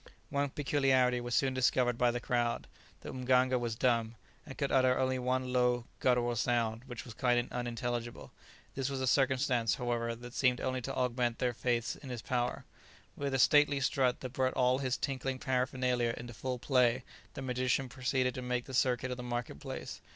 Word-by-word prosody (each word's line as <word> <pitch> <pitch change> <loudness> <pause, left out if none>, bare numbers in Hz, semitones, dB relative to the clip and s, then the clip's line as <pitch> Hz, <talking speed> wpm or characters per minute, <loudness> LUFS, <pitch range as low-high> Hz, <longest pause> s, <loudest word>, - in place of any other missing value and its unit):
One 140 0 0
peculiarity 130 -3 +2
was 120 0 -2
soon 135 -1 +2
discovered 125 -1 +2
by 120 +1 +3
the 120 +1 -1
crowd; 120 -1 -1 0.4
the - - -7
mganga 130 0 +2
was 120 -2 -2
dumb, 115 -2 +1 0.3
and 135 - -9
could 140 -2 -1
utter 130 -1 +4
only 130 0 +1
one 125 0 -1
low, 125 -1 +2
guttural 120 -1 +2
sound, 115 0 0
which 120 -3 -7
was 120 - -9
quite 120 +1 +1
unintelligible; 120 -1 -4 0.4
this 135 0 -2
was 135 -1 -3
a 130 - 0
circumstance, 130 -4 +2
however, 115 -1 -2
that 120 +1 -10
seemed 125 -2 +2
only 130 0 -2
to 135 +2 -4
augment 125 -2 0
their 125 -1 0
faith 120 0 -1
in 135 - -9
his 120 -3 -5
powers. 120 +2 -1 0.5
With 140 -1 -2
a - - +3
stately 145 +1 +5
strut 130 -2 +1
that 130 -1 -6
brought 130 -1 0
all 125 +1 +3
his 130 -2 -1
tinkling 135 -1 -2
paraphernalia 125 -2 0
into 120 0 -8
full 125 +3 -3
play, 125 -1 +2 0.3
the 135 - -5
magician 130 +1 0
proceeded 125 0 0
to 130 - -5
make 125 -1 -2
the 135 - -9
circuit 125 0 +1
of 125 - -3
the - - -5
market 120 -10 -4
place. - - -7
125 Hz, 190 wpm, -32 LUFS, 120-130 Hz, 0.5 s, stately